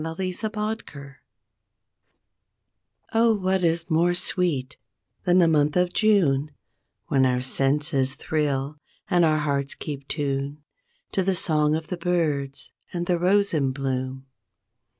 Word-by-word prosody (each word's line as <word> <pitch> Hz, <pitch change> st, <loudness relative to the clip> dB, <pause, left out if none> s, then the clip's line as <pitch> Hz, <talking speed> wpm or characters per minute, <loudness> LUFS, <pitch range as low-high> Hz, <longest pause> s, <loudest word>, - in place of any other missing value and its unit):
33 185 Hz, +6 st, -3 dB, 0.3 s
JUNE 140 Hz, -2 st, -12 dB, 2.0 s
Oh 225 Hz, 0 st, +4 dB
what 190 Hz, -1 st, 0 dB
is 170 Hz, 0 st, 0 dB
more 170 Hz, +2 st, +3 dB
sweet 170 Hz, -7 st, 0 dB, 0.5 s
than 180 Hz, 0 st, +4 dB
the 175 Hz, -2 st, +5 dB
month 150 Hz, 0 st, +2 dB
of 180 Hz, 0 st, +1 dB
June 160 Hz, -10 st, +3 dB, 0.6 s
When 135 Hz, -1 st, +2 dB
our 125 Hz, -1 st, +2 dB
senses 135 Hz, +1 st, +1 dB
thrill 145 Hz, -2 st, -2 dB, 0.3 s
and 175 Hz, -2 st, +4 dB
our 155 Hz, -1 st, +3 dB
hearts 140 Hz, -2 st, -1 dB
keep 140 Hz, -2 st, -7 dB
tune 140 Hz, 0 st, -3 dB, 0.5 s
To 195 Hz, -, 0 dB
the 190 Hz, 0 st, +1 dB
song 150 Hz, -3 st, +2 dB
of 160 Hz, -1 st, -5 dB
the 180 Hz, -, -3 dB
birds 155 Hz, -6 st, -1 dB, 0.2 s
and 175 Hz, -1 st, -3 dB
the 175 Hz, -1 st, +1 dB
rose 200 Hz, +3 st, +2 dB
in 135 Hz, -4 st, +1 dB
bloom? 130 Hz, -1 st, -3 dB
155 Hz, 130 wpm, -24 LUFS, 140-180 Hz, 2.0 s, the